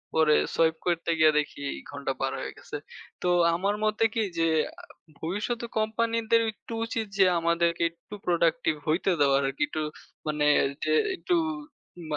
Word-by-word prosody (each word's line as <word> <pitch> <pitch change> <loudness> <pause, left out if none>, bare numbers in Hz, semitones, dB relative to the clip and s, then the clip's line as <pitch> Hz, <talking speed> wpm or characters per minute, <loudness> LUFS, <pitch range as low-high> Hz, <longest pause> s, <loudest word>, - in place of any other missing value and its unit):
পরে 155 -1 +5 0.2
সোয়াইপ 160 -1 +3
করতে 170 -1 0
গিয়ে 155 0 +7
দেখি, 145 -1 -4 0.3
ঘন্টা 140 -1 -3
পার 135 - 0
হয়ে - - -5
গেছে। - - -7 0.4
তো - - -1 0.3
আমার 200 +4 0
মতে 215 +1 +1
কি 225 - 0 0.2
যে, 165 - +3 0.3
আ - - -23 0.4
ভবিষ্যতে 210 +8 -3
কোম্পানিদের 230 +1 +1
একটু 220 - -11
উচিত, 225 -1 -2
যে 195 - +6
আমাদেরকে 170 0 +1
একটু 170 +5 -12
প্রোডাক্টিভ 170 +3 +2
হইতে 165 +5 +2
দেওয়ার 140 -1 +4
আরকি। 135 - -1
একটু 155 - -3 0.5
মানে 150 -1 0 0.2
ওইযে 155 +3 -2 0.2
একটু 360 - -2 0.7
উম 160 -2 -9
170 Hz, 155 wpm, -27 LUFS, 155-215 Hz, 0.7 s, গিয়ে